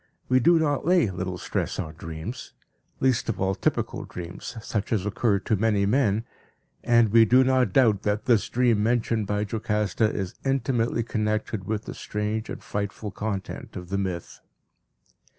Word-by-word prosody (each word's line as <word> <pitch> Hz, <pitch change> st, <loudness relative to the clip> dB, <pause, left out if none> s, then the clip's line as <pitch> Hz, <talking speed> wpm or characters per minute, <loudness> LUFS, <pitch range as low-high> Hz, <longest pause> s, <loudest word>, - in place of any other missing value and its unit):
We 130 Hz, 0 st, +5 dB
do 170 Hz, +7 st, +5 dB
not 145 Hz, -3 st, +1 dB
lay 170 Hz, -, +3 dB
little 90 Hz, 0 st, -4 dB
stress -, -, -3 dB
on 80 Hz, -, -4 dB
dreams, 80 Hz, +8 st, -7 dB, 0.5 s
least 130 Hz, -3 st, +1 dB
of 115 Hz, -, -2 dB
all 95 Hz, 0 st, +1 dB
typical -, -, -1 dB
dreams 90 Hz, +7 st, -8 dB
such 110 Hz, -1 st, -3 dB
as 105 Hz, -4 st, +1 dB
occur 105 Hz, 0 st, +1 dB
to 110 Hz, -, +1 dB
many 105 Hz, -1 st, +2 dB
men, 110 Hz, -1 st, +2 dB, 0.6 s
and 115 Hz, -2 st, +4 dB
we 115 Hz, +2 st, +7 dB
do 125 Hz, +4 st, +5 dB
not 130 Hz, -1 st, +2 dB
doubt 115 Hz, -8 st, +4 dB
that 105 Hz, +1 st, -1 dB
this 120 Hz, -5 st, +3 dB
dream 120 Hz, -4 st, +2 dB
mentioned 115 Hz, -1 st, +1 dB
by 105 Hz, +1 st, 0 dB
Jocasta 105 Hz, 0 st, 0 dB
is 95 Hz, -2 st, -3 dB
intimately 125 Hz, -3 st, 0 dB
connected 110 Hz, -2 st, -2 dB
with 110 Hz, +1 st, -3 dB
the -, -, -6 dB
strange 105 Hz, +1 st, -3 dB
and -, -, -6 dB
frightful 105 Hz, +1 st, -4 dB
content 100 Hz, -2 st, -5 dB
of 90 Hz, -1 st, -7 dB
the 100 Hz, 0 st, -1 dB
myth. 90 Hz, -3 st, -4 dB
110 Hz, 165 wpm, -26 LUFS, 100-120 Hz, 0.6 s, we